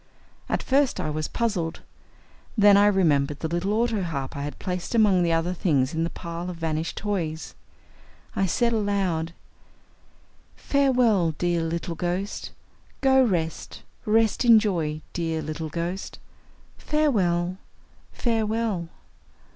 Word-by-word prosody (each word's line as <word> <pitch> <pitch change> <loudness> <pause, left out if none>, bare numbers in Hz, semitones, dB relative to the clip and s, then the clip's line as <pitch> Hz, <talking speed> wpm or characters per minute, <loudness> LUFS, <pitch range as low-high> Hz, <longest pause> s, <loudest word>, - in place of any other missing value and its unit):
At - - -1
first 275 0 +2
I 155 - -2
was 155 0 -2
puzzled. 195 -9 -2 0.8
Then 205 -1 +7
I 205 +1 +6
remembered 150 -8 +2
the 160 - -1
little 175 +4 -1
autoharp 195 - -1
I 140 - -4
had 145 +1 -5
placed 180 +4 -4
among 205 -5 +4
the 170 -1 +2
other 165 +2 +1
things 145 -6 +1
in 160 0 0
that 165 - -4
pile 170 +1 -5
of 180 - -5
vanished 160 -1 -3
toys. 170 -7 -3 0.8
I 195 - +1
said 235 +6 +1
aloud: 195 -6 0 1.2
"Farewell, 245 - +2
dear 175 -1 0
little 165 +1 -3
ghost. 180 +4 -3 0.5
Go 265 -1 +5
rest. 170 -8 -2 0.2
Rest 220 +2 +2
in 235 -2 +8
joy, 165 -8 -1
dear 165 -2 -1
little 155 +1 -4
ghost. 170 +4 -4 0.6
Farewell, 185 - +1 0.5
farewell." 220 -6 -1
180 Hz, 125 wpm, -25 LUFS, 165-215 Hz, 1.2 s, in